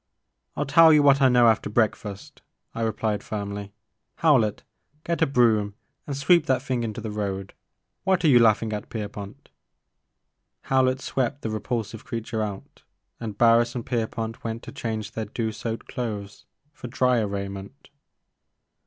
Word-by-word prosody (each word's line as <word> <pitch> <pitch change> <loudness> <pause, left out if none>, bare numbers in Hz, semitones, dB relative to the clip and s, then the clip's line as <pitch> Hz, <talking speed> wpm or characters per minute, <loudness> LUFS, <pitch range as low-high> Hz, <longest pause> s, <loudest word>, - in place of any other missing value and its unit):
" - - -52
I - - -1
*11 - - -8
tell 165 +2 +7
you 150 -1 +5
what 140 0 +5
I 135 - +6
know 125 -1 +5
after 110 -2 +2
breakfast, 105 -2 -2 0.3
I 115 - -4
replied 110 -1 -1
firmly, 100 -1 -5 0.4
Howlett, 125 -10 +2 0.4
get 170 0 -2
a 160 - +4
broom 110 -6 +2 0.3
and 140 -2 -3
sweep 160 +3 +4
that 130 -2 +1
thing 130 -3 -1
into 115 0 -4
the 110 -1 -5
road, 100 -2 -4 0.3
— - - -54
what 190 -2 +2
are - - +6
you 125 -5 +7
laughing 110 -1 +3
at, 105 - -5
Pierpont?" 105 +3 -7 1.1
Howlett 130 0 +1
swept 135 +2 -2
the 110 - -2
repulsive 110 0 -4
creature 115 -1 -4
out 100 -2 -6 0.4
and 110 -3 -6
Barris 120 +1 +4
and 120 - -4
Pierpont 115 -1 -3
went 115 0 -4
to - - -8
change 110 -2 -4
their 110 0 -4
dew 110 +2 -3
soaked 115 +1 -5
clothes 105 -4 -5 0.3
for - - -8
dryer 125 -3 +2
raiment. 100 +6 -7
115 Hz, 160 wpm, -25 LUFS, 105-130 Hz, 1.1 s, tell